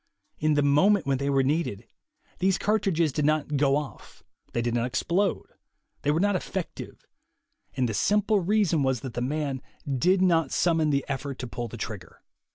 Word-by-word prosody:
In 155 0 +2
the 145 - +3
moment 170 +7 +4
when 135 -1 0
they 140 0 -1
were 135 -1 +3
needed, 135 -7 -1 0.5
these 190 0 +2
cartridges 190 -7 +1
did 150 - -1
not 150 0 +1
"go 140 -1 +3
off," 145 -7 -6 0.3
they 120 - -1
did 120 -1 -1
not 120 0 0
explode, 175 +10 0 0.6
they - - -1
were 150 +2 +2
not 205 +1 +2
ef - - -4
fective, 190 -3 -6 0.8
and 125 - +2
the 110 - -3
simple 210 - +2
reason 190 -4 +2
was 130 -3 0
that 130 -3 -6
the 120 - -3
man 140 0 -2 0.4
did 185 +7 +3
not 165 -6 +3
summon 160 -3 +2
the 140 -2 0
effort 140 -1 -4
to - - -5
pull 120 0 -5
the - - -9
trigger. - - -8
150 Hz, 185 wpm, -26 LUFS, 135-180 Hz, 0.8 s, moment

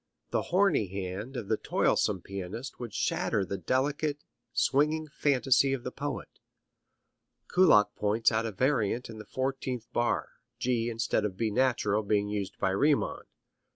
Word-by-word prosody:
The - - +1
horny 180 - +3
hand 100 +7 -5
of 115 -5 -5
the 110 - +1
toilsome 95 -2 +1
pianist 100 +7 -6
would 120 -3 -6
shatter 100 0 0
the 100 +2 -4
delicate, 145 +3 0 0.3
swinging 150 +6 +2
fantasy 135 -2 +2
of 130 -3 -3
the 125 - -4
poet. 145 +2 -5 1.1
Kullak 180 - +5
points 105 +3 +2
out 115 0 0
a - - -3
variant 120 0 0
in 110 - -9
the 105 - -9
fourteenth 130 -2 -3
bar, 120 0 0 0.3
G 120 -2 0
instead 115 -2 0
of 100 -3 -3
B 110 0 0
natural 110 -3 +2
being 105 -1 0
used 100 -2 -3
by 95 - +1
Riemann. 145 +9 +1
115 Hz, 150 wpm, -29 LUFS, 105-135 Hz, 1.1 s, Kullak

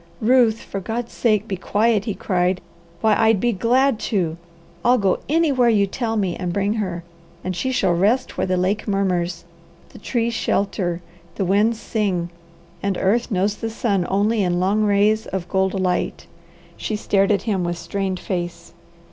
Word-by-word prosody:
"Ruth, 230 -1 +4
for 195 - -5
God's 230 +5 -4
sake, 215 -2 +1
be 195 - -2
quiet!" 210 +2 +1
he 210 - -2
cried. 180 0 0 0.4
"Why 220 -1 +4
I'd 225 -2 +3
be 240 +4 +2
glad 240 +4 +2
to! 175 -7 0 0.5
I'll 245 +1 +5
go 195 -4 +1
anywhere 285 -6 +3
you 205 -3 +4
tell 225 +2 -2
me, 190 -4 0
and 180 -1 -3
bring 200 +3 0
her, 175 -4 -4 0.4
and 185 0 -3
she 260 +8 -1
shall 190 -8 +2
rest 215 +9 +1
where - - -1
the 185 0 +1
lake 195 +5 0
murmurs, 180 -4 -1 0.4
the - - -13
trees 235 +1 -1
shelter, 185 -5 -1 0.3
the 195 - -1
winds 210 +4 +2
sing, 190 -7 -1 0.5
and 200 -2 -1
earth 220 +5 +1
knows 200 0 0
the 225 - -3
sun 205 -5 0
only 210 +3 +2
in 175 -2 +1
long 195 +4 +2
rays 210 +1 +2
of 185 -2 -4
gold 190 0 0
light." 180 -1 -1 0.5
She 215 - -3
stared 195 -1 +2
at 200 -2 +1
him 200 -5 0
with 175 0 -2
strained 190 +1 -3
face. 175 -2 -5
200 Hz, 175 wpm, -21 LUFS, 185-225 Hz, 0.5 s, I'll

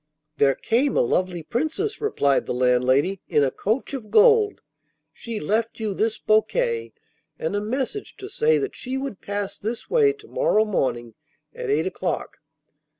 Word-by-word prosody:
'There 135 -1 +4
came 250 - +1
a - - +5
lovely 175 +6 0
princess,' 320 - -2
replied 140 - +1
the - - -2
landlady, 130 +8 +2
'in 150 -4 +3
a 135 - +1
coach 225 - -2
of 235 -6 -6
gold. 440 - +5 0.5
She 230 -2 -6
left 220 +9 -1
you 215 -2 -2
this 220 +3 0
bouquet, 460 - +1 0.4
and 160 +5 -2
a 205 - 0
message 265 - -3
to 390 -2 -8
say 455 +3 +2
that 410 - -3
she 260 +1 -4
would 265 -7 -5
pass 205 -1 -4
this 225 +3 -5
way 440 -4 +5
to 425 0 -17
morrow 430 - +2
morning 120 - -1 0.4
at 485 -2 -5
eight 425 - +2
o'clock. - - -3
225 Hz, 160 wpm, -23 LUFS, -, 0.5 s, a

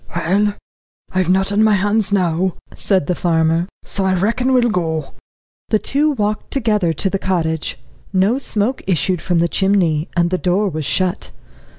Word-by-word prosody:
"Well, 205 +4 +1 0.6
I've 185 -2 0
naught 190 +1 +2
on 205 +1 +2
my 215 -1 +4
hands 205 +2 +1
now," 180 -1 +1 0.2
said 190 -7 +2
the 180 - 0
farmer, 165 0 +1 0.2
"so 195 - -1
I 190 0 +2
reckon 230 +8 0
we 255 - +5
will 240 -1 +1
go." 160 -6 -2 0.6
The 215 - +3
two 285 +7 0
walked 210 -4 -2
together 210 -9 +1
to 180 +5 -1
the 195 - -1
cottage. 160 -5 -1 0.3
No 195 +7 +2
smoke 235 -1 -1
issued 185 -1 0
from 175 -2 0
the 170 +1 +3
chimney, 175 -5 +1
and 170 0 +2
the 185 - 0
door 195 +3 +1
was 155 -3 -4
shut. 185 +6 -1
190 Hz, 175 wpm, -18 LUFS, 170-210 Hz, 0.6 s, we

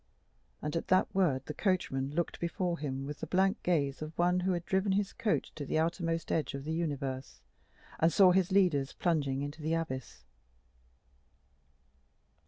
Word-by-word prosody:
and 150 +2 -2
at 165 - -2
that 185 0 +3
word 155 -9 +2
the 150 - -5
coachman 145 -8 0
looked 170 0 -1
before 170 0 -1
him 135 -2 -3
with 150 +1 -6
the 160 - -5
blank 190 +5 +2
gaze 145 -6 0
of 155 +1 -7
one 180 +1 +3
who 185 +1 +1
had 175 -1 -3
driven 190 +1 +1
his 200 0 0
coach 215 - -1
to 150 - -6
the 140 - -1
outermost 165 0 -1
edge 150 -4 0
of 135 - -5
the 155 +2 -3
universe, 140 -5 -3 0.6
and 165 +1 +4
saw 185 +3 +6
his 185 0 +2
leaders 175 -9 +3
plunging 140 -6 0
into 145 +2 -6
the 160 +2 0
abyss. 130 - -4
165 Hz, 170 wpm, -31 LUFS, 140-180 Hz, 0.6 s, saw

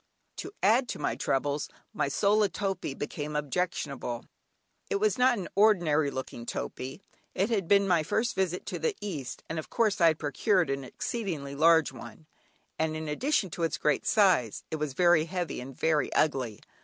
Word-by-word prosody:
To - - -6
add 235 +5 +4
to - - -3
my 145 - -1
troubles 145 +2 -1 0.2
my - - 0
sola 205 +8 +3
topee 195 -7 -3
became 150 0 -4
objectionable. 145 -5 -2 0.6
It - - 0
was 420 -7 +1
not 250 -1 +4
an 185 - -4
ordinary 175 -8 +4
looking 130 -3 -6
topee; 130 +8 -5 0.3
it 195 -1 0
being 200 +1 +5
my 175 -3 +3
first 220 +9 0
visit 185 -2 -1
to - - -4
the 465 -3 0
East, 150 - -5
of 160 -1 -5
course 215 -4 +1
I 170 - +7
had 160 -2 +3
procured 160 - +1
an 135 0 -2
exceedingly 155 - -4
large 160 +2 +4
one, 160 - -11 0.5
and 160 0 0
in 155 0 -4
addition 200 - 0
to 170 - -6
its 165 0 0
great 150 -4 0
size, 180 - +3
it 160 - -1
was 150 -3 -3
very 175 +1 +4
heavy 175 -5 -3
and 130 +1 -9
very 155 -4 +1
ugly. 130 -8 0
165 Hz, 170 wpm, -29 LUFS, 145-200 Hz, 0.6 s, I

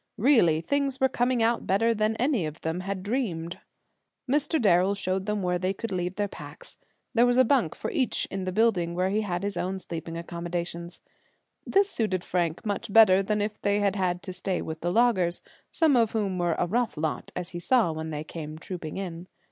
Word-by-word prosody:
Really, 195 - +4
things 275 +6 -1
were 265 - +4
coming 245 -2 +1
out 230 +1 +1
better 225 +5 +3
than 215 0 0
any 240 - +1
of 155 +2 -9
them 160 +2 -2
had 190 0 -4
dreamed. 190 -8 -2 0.7
Mr. 295 +4 +2
Darrel 190 -2 +3
showed 190 0 -2
them 210 -2 -1
where 180 0 0
they 185 +2 -1
could 230 +3 -5
leave 180 0 -2
their 205 0 0
packs. - - -10 0.4
There 240 0 +5
was 245 0 +2
a 260 - +6
bunk 235 - +2
for - - -4
each 260 -4 +1
in 190 -1 -3
the 185 - -2
building 185 -5 +2
where 185 +2 +1
he 215 +2 +1
had 180 -3 -3
his 200 0 -2
own 190 +2 -2
sleeping 165 -2 -6
accommodations. 170 0 -5 0.7
This 395 0 +4
suited 190 -6 -1
Frank 175 +2 -1
much 205 0 -3
better 195 -3 +7
than 210 +1 0
if 210 0 -5
they 205 0 +2
had 200 -1 +1
had 180 -3 -1
to 185 - -5
stay 185 0 -1
with 160 0 -6
the 175 - 0
loggers, 190 -6 +2 0.3
some 315 -4 +3
of 230 -3 +3
whom 200 -5 -1
were 175 -1 +1
a - - +1
rough 220 -2 -1
lot, 155 0 -3
as 180 0 -4
he 175 - -5
saw 225 -2 +3
when 160 0 -5
they 150 -1 -4
came 155 -1 -7
trooping 165 -1 -6
in. 180 -2 -6
190 Hz, 210 wpm, -27 LUFS, 175-225 Hz, 0.7 s, better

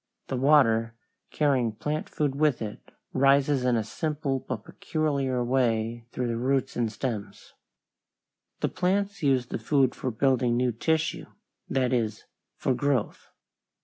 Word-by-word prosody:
The - - -1
water, 120 -5 +4 0.3
carrying 130 -7 +1
plant 155 - -3
food 145 -3 -1
with 145 -2 +2
it, 105 -2 -7 0.2
rises 140 0 +3
in 125 -1 +2
a 110 - +1
simple 145 +3 -2
but 110 -3 -5
peculiar 140 -5 -1
way 120 -2 0
through 125 - -2
the 115 -1 -1
roots 135 +1 0
and 115 -2 0
stems. 110 -2 -5 1.1
The - - +1
plants 200 +2 0
use 135 -4 +2
the - - -5
food 130 +2 +2
for 130 - -3
building 125 0 +2
new 125 0 +2
tissue, 160 +7 -1 0.4
that 130 -1 +1
is, 110 -3 -1 0.3
for 130 - +1
growth. 140 0 -1
130 Hz, 140 wpm, -27 LUFS, 120-145 Hz, 1.1 s, water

